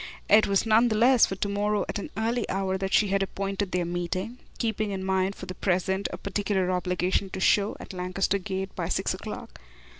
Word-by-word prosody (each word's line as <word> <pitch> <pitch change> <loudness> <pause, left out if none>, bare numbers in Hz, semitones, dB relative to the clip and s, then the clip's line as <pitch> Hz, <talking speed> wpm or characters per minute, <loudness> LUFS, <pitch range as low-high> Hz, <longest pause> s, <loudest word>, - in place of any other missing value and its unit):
It 210 0 +6
was 195 +1 +2
none 225 +2 +5
the 220 - 0
less 245 +2 +6
for 195 - -4
to 200 - -2
morrow 205 +1 0
at - - -3
an - - -6
early 230 +1 -1
hour 190 0 0
that 190 0 -2
she 205 0 +4
had 195 0 +1
appointed 195 0 -2
their 180 -1 0
next 175 - -4
meeting, 185 +7 -3 0.2
keeping 215 -2 -1
in 190 -1 -3
mind 190 +1 0
for - - -8
the 185 - -6
present 190 +1 0
a - - -5
particular 200 -2 -1
obligation 180 +1 0
to 190 - -5
show 200 +2 +3
at - - -9
Lancaster 185 +2 0
Gate 190 +1 -4
by - - -3
six - - 0
o'clock. - - -8
195 Hz, 215 wpm, -27 LUFS, 185-210 Hz, 0.2 s, It